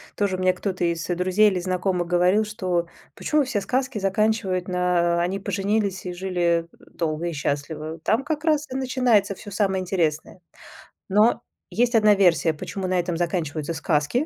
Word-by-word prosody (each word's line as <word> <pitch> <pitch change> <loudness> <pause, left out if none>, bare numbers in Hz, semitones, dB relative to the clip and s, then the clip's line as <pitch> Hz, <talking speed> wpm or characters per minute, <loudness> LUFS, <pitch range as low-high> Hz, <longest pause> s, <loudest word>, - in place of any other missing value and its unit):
тоже 200 -3 0
мне 185 0 +2
кто-то 185 -1 -3
из 170 -1 -1
друзей 185 +4 +3
или 185 -2 -2
знакомых 180 -1 -1
говорил, 180 +4 +3
что 185 -5 -2 0.3
почему 300 -1 +1
все 250 -6 -2
сказки 255 +2 -1
заканчивают, 195 -2 0
на 180 -1 +1
"они 185 +3 -1
поженились 200 0 -1
и 180 - -4
жили 175 -2 0 0.3
долго 160 0 -2
и 170 - -3
счастливо", 150 +2 -3
там 220 +11 +1
как 300 +1 -3
раз 305 -2 +2
и - - -4
начинается 250 -7 +2
всё 205 - -11
самое 195 -2 0
интересное. 175 -2 -2 0.7
Но 215 +5 +3 0.3
есть 240 +1 +1
1 215 -2 +6
версия, 170 -5 +3
почему 185 +4 -5
на 185 -1 +1
этом 175 -1 -2
заканчиваются 165 -3 -2
сказки, 160 - 0
185 Hz, 160 wpm, -24 LUFS, 170-210 Hz, 0.7 s, 1